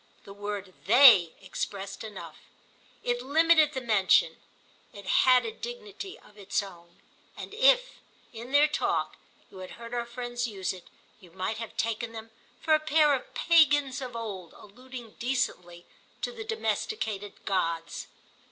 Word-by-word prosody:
The 195 - -11
word 205 -2 -6
"they" 225 -8 +8
expressed 195 +2 -5
enough; 215 -2 -9 0.7
it 245 0 -1
limited 310 +2 +4
the 260 - -3
mention, 225 - +3 0.6
it 200 -1 -11
had 255 +4 +4
a 450 - -3
dignity 440 -3 -8
of 210 - -20
its 200 +1 -1
own, 175 -3 -14 0.4
and - - -8
if, - - +3 0.3
in 235 +3 -9
their 290 +2 +6
talk, 300 - -1 0.3
you 190 - -12
had 185 - -8
heard 235 0 -9
our 240 -1 -2
friends 240 0 -4
use 195 -4 -3
it, 180 -2 -13 0.3
you 180 - -17
might 190 +5 -4
have 230 - -8
taken 230 0 -2
them 225 0 -9 0.3
for 315 - +1
a 310 - +5
pair 305 -1 +3
of 260 - -4
pagans 290 -5 +3
of 250 -2 -6
old 200 -7 -6
alluding 245 +1 -12
decently 180 -9 -2 0.4
to - - -1
the 470 -2 -7
domesticated 220 - -3
gods. 165 -3 -2
235 Hz, 150 wpm, -28 LUFS, 200-295 Hz, 0.7 s, they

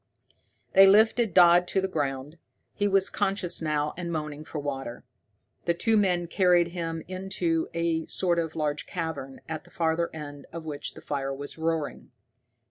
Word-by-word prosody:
They 195 0 +9
lifted 220 +2 +5
Dodd 175 0 +7
to 190 - +1
the 190 - 0
ground. 145 -2 -3 0.3
He 205 - 0
was 195 -1 +2
conscious 195 -4 -1
now, 150 -1 0
and 170 -1 -4
moaning 150 -2 -4
for 155 - -7
water. 135 -4 -4 0.6
The 170 - +2
two 225 +6 +2
men 180 -4 +2
carried 175 -1 +3
him 165 -2 -4
into 185 -3 -1
a 170 -1 0
sort 175 -2 +1
of 160 -1 -3
large 150 -2 -2
cavern, 160 -6 -5
at 160 -1 -5
the 175 - -19
farther 170 -1 0
end 145 -2 -8
of 165 -1 -7
which 145 -2 -5
the - - -11
fire 135 -2 -3
was 145 +3 -8
roaring. 160 -2 -2
165 Hz, 165 wpm, -27 LUFS, 150-180 Hz, 0.6 s, They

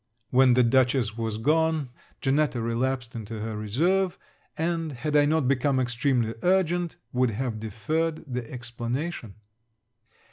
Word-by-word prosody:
When 130 -1 +5
the 125 - +5
Dutchess 125 -2 +2
was 115 -2 -3
gone, 155 +3 +1 0.3
Janetta 140 -1 +1
relapsed 120 +1 -1
into 110 -1 -6
her 110 0 -4
reserve; 170 - +1 0.4
and, 165 -1 -1
had 145 +4 -3
I 145 -1 +6
not 155 -2 +2
become 135 0 +2
extremely 120 -1 +1
urgent, 175 -2 +1 0.2
would 125 0 +2
have 115 0 -3
deferred 155 +10 -2
the 125 -3 -4
explanation. 120 - -4
130 Hz, 130 wpm, -26 LUFS, 115-155 Hz, 0.4 s, I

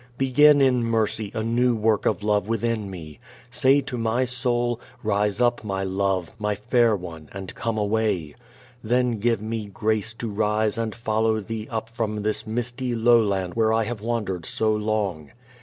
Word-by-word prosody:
Begin 145 +2 +5
in 125 -3 +3
mercy 110 -2 0
a 110 - -1
new 120 +2 +2
work 110 -1 +1
of - - 0
love 105 -1 +1
within 115 -2 -1
me. 80 -5 -9 0.3
Say 135 +2 +4
to 130 -2 -5
my 115 +3 +1
soul, 120 -1 -1 0.2
"Rise 105 -1 0
up, 120 -1 +2
my 95 -2 -2
love, 95 -2 -1
my 105 -1 0
fair 115 +2 +2
one, 85 -5 -8
and 95 -2 -7
come 115 -1 -3
away." 105 -7 0 0.5
Then 120 0 +1
give 115 -1 +1
me 110 -1 -3
grace 110 +2 -1
to 115 +1 -5
rise 105 +1 0
and 115 -2 -2
follow 110 -1 +1
Thee 110 +1 -5
up 110 -1 -3
from 110 -3 -3
this 110 +1 -2
misty 120 +2 -2
lowland 110 -6 +3
where 110 -1 +2
I 115 0 +2
have 110 -1 -5
wandered 105 -7 -2
so 110 -1 +1
long. 105 -7 -2
110 Hz, 170 wpm, -24 LUFS, 105-120 Hz, 0.5 s, Begin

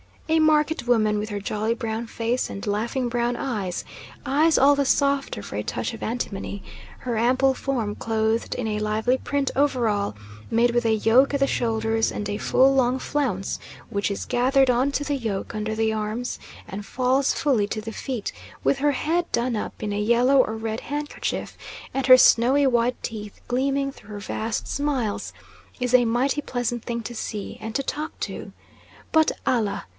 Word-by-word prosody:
A 320 0 +4
market 310 -3 +2
woman 215 -3 +3
with 210 - -3
her 205 -2 -4
jolly 215 +3 -1
brown 230 -1 -4
face 230 +2 -1
and 195 - -6
laughing 230 +5 -1
brown 240 0 0
eyes 210 -10 -3 0.4
eyes 305 +3 +3
all 285 +2 +6
the 280 0 +1
softer 280 0 +1
for - - -6
a - - 0
touch - - -3
of - - -9
antimony 205 -4 -4 0.4
her 240 -3 -3
ample 255 +4 +3
form 240 -6 -2
clothed 220 0 0
in 245 - -3
a 210 -1 -1
lively 215 +4 +1
print 280 0 -1
overall, 230 - +1 0.3
made 235 +1 +3
with 240 0 +1
a 225 - +3
yoke 240 +6 +4
at 280 - -1
the 275 - +4
shoulders, 225 -2 0
and 205 0 -4
a 205 - -2
full 265 +5 +4
long 255 -1 +2
flounce 255 -10 -2 0.3
which 200 0 -1
is 200 - -3
gathered 260 +2 +3
on 250 +3 +2
to 290 - 0
the 290 -1 -1
yoke 220 -6 -3
under 215 0 -2
the 220 0 +1
arms 220 +3 -3 0.3
and 200 +1 -6
falls 260 +3 +1
fully 245 -9 +1
to 215 +1 -3
the 225 +1 -6
feet; 235 -1 -4 0.3
with 275 - +2
her 290 +1 +2
head 335 +6 0
done 235 -1 +1
up - - -5
in 210 - -2
a 205 - -1
yellow 240 +5 +4
or 235 -4 +3
red 220 0 -3
handkerchief, 295 +1 -4 0.4
and 270 0 -1
her 255 -1 +10
snowy 255 +4 +5
white 245 -1 +2
teeth 210 -2 -6
gleaming 275 +2 0
through 220 - -17
her 205 -1 -6
vast 215 +3 -3
smiles, 270 -7 -2 0.5
is 250 0 -1
a 250 -1 +6
mighty 255 +6 +1
pleasant 240 -3 -2
thing 235 -1 -3
to 240 - -6
see, 210 -3 -5
and 220 +1 -6
to 275 - 0
talk 305 +3 -4
to. - - -5 0.6
But, 315 -1 +4
Allah! 230 -6 0
240 Hz, 185 wpm, -24 LUFS, 220-270 Hz, 0.6 s, her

